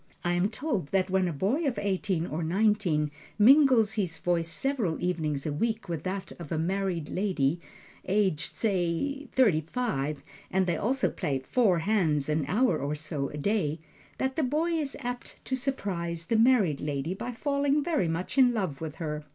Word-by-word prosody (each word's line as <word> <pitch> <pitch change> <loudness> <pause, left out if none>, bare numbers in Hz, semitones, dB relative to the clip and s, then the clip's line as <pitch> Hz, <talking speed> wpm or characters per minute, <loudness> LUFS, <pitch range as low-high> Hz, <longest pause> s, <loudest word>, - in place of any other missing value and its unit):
I 175 - +1
am 175 +3 +2
told 225 - -2
that 185 +2 0
when 190 -1 +2
a - - -1
boy 200 - 0
of 255 - -1
eighteen 190 -3 0
or 160 0 -3
nineteen 175 -4 +1 0.3
mingles 245 -2 +6
his 185 -6 -1
voice 170 -1 0
several 220 - -1
evenings 155 -6 -1
a 150 - -1
week 220 +8 -1
with 165 -3 -3
that 190 +1 -3
of 170 -4 -9
a 160 - 0
married 180 -1 -1
lady 175 -5 0 0.5
aged, 190 -5 0
say, 205 - -1
thirty 210 -12 +4
five, 155 - -2 0.3
and 190 0 +2
they 175 -2 0
also 255 +11 +1
play 140 -2 -1
"four 185 - +2
hands" 160 -6 +1
an 150 -1 +1
hour 200 - +2
or 145 +2 -2
so 150 -2 -3
a 150 - -7
day, 160 -2 0 0.4
that 265 0 -1
the - - +2
boy 305 +5 0
is 305 -4 -2
apt 245 -1 -5
to 260 - -1
surprise 185 -11 -3
the 230 - 0
married 220 - +4
lady 145 +3 -2
by 240 +6 -5
falling 285 +3 +1
very 300 - +1
much 175 +11 -2
in 245 -2 +5
love 180 -10 -2
with 155 -2 -5
her. 150 -2 -4
185 Hz, 180 wpm, -28 LUFS, 160-235 Hz, 0.5 s, mingles